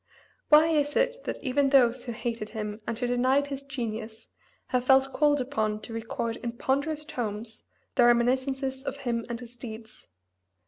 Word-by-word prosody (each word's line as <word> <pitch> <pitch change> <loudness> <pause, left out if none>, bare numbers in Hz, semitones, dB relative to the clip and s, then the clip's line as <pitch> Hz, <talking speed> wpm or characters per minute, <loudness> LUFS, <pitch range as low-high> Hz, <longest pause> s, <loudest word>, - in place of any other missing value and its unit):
Why 310 +2 +7
is 295 -2 +1
it - - +2
that - - -3
even 275 0 +2
those 250 -2 +4
who 240 - -3
hated 230 -1 -4
him 210 -1 -5
and 230 -1 -2
who 245 - -1
denied 255 +3 +2
his 280 -1 -5
genius 230 -5 -6 0.4
have 250 -1 +1
felt 265 +1 +4
called 295 -1 +3
upon 220 -5 -1
to 225 - -8
record 230 0 -3
in 235 -1 -4
ponderous 285 +5 -1
tomes 225 -6 -4 0.3
their 245 -3 +5
reminiscences 260 +2 +1
of 275 0 -5
him 230 -1 -1
and 235 -1 -3
his 245 0 -11
deeds? 220 -2 -10
245 Hz, 170 wpm, -28 LUFS, 230-275 Hz, 0.4 s, Why